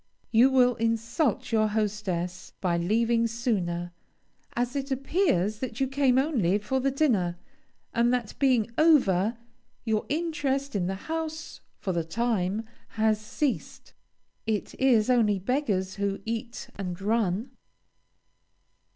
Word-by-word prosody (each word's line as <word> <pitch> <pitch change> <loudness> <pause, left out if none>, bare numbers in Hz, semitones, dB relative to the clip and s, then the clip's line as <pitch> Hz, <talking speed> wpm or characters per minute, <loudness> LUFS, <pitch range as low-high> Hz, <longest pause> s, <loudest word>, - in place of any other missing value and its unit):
You 240 +4 +6
will 250 -2 +4
insult 230 - 0
your 215 -1 +3
hostess 205 -4 -2
by 180 -3 +1
leaving 230 +6 +2
sooner, 185 -7 -2 0.6
as 245 +2 -1
it 275 0 -2
appears 265 - +1
that 245 -3 -5
you 270 - +2
came 270 -1 +2
only 245 - +2
for 210 +6 -1
the 270 +1 +1
dinner, 225 - +1 0.6
and 235 0 +3
that 245 -4 -1
being 250 -5 +3
over, 235 - +4 0.5
your 220 -2 0
interest 285 -4 -1
in 180 -3 0
the 190 - -2
house, 320 -1 -4 0.2
for 190 - -3
the 170 -1 0
time, 210 +2 -1 0.3
has 215 -1 +2
ceased. 260 +6 -3 0.5
It 215 -2 -1
is 240 -5 +4
only 225 -5 +3
beggars 195 -4 -1
who 200 -1 -1
"eat 230 +1 -5
and 180 -3 -4
run!" 215 +1 0
230 Hz, 125 wpm, -27 LUFS, 200-265 Hz, 0.6 s, You